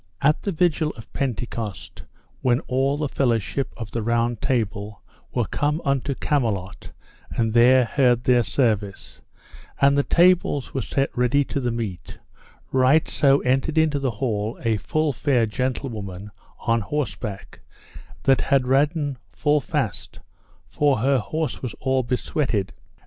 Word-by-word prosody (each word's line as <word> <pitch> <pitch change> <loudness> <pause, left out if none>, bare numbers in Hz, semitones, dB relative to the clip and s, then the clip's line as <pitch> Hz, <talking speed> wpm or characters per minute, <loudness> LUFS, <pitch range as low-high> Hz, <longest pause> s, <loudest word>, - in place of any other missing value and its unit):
At 150 +2 +2
the 200 - -2
vigil 165 -2 +1
of 110 - -13
Pentecost, 115 -6 -4 0.4
when 125 -2 +2
all 135 +2 0
the 150 0 -1
fellowship 130 0 -1
of 115 -3 -7
the 115 - -2
Round 115 0 0
Table 105 -4 -2 0.3
were 120 -3 0
come 150 +8 -1
unto 140 0 0
Camelot 110 -12 -2 0.4
and 115 -2 -1
there 125 +2 +6
heard 125 -1 +2
their 125 -1 +4
service, 105 -5 -1 0.6
and 140 0 +5
the 140 - +4
tables 170 -4 +2
were 135 - -1
set 135 +2 -1
ready 125 +3 +2
to 140 - -3
the 125 -2 -1
meat, 110 -7 -5 0.5
right 135 +4 +4
so 140 -1 +3
entered 135 +5 0
into 155 -2 +3
the 135 -1 0
hall 110 -2 -2
a 115 -2 +1
full 155 +6 -1
fair 125 -2 +2
gentlewoman 105 -5 -4 0.3
on 115 -1 +1
horseback, 110 -6 -4 0.6
that 135 -1 +4
had 135 -2 +2
ridden 145 +1 +1
full 150 0 +2
fast, - - -3 0.5
for 140 +9 +1
her 135 +4 +2
horse 155 +8 -3
was 125 - -5
all 130 0 +1
besweated. 120 -4 -1
130 Hz, 140 wpm, -23 LUFS, 115-140 Hz, 0.6 s, there